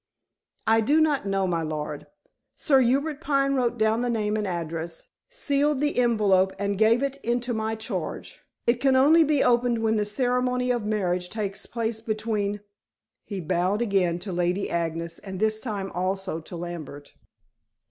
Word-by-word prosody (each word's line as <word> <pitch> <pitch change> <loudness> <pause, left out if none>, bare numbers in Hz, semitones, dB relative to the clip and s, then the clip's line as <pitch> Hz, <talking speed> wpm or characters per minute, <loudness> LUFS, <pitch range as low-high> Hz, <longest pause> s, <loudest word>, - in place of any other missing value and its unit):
"I 225 0 +4
do 290 +8 +3
not 300 -8 +2
know, 195 -1 +1
my 170 -3 0
lord. 150 -1 -4 0.5
Sir 275 -4 +3
Hubert 280 +5 +1
Pine 275 -3 +1
wrote 245 -3 0
down 220 +1 +2
the 245 - 0
name 215 -2 0
and 210 -1 -1
address, 165 -1 -4 0.3
sealed 295 - 0
the 295 +1 0
envelope, 200 -6 +3
and 200 0 -1
gave 225 +4 +4
it 275 0 -2
into 240 +1 -1
my 220 0 -1
charge. 220 0 -5 0.2
It 240 +1 +2
can 270 -1 +4
only 305 +5 +6
be 295 -2 +2
opened 240 -1 +2
when 220 0 +2
the 210 - +1
ceremony 250 +2 0
of 240 -3 -1
marriage 185 -4 -1
takes 205 -1 -4
place 225 -1 -3
between 215 -2 -2 0.3
" - - -62
he 200 - -5
bowed 180 +6 0
again 190 -6 +1
to 195 - -4
Lady 180 +2 -1
Agnes 165 0 -2
and 190 -2 -7
this 215 0 +1
time 205 -5 -4
also 185 -1 -2
to 165 +2 -9
Lambert. 165 -4 -7
215 Hz, 170 wpm, -25 LUFS, 185-245 Hz, 0.5 s, only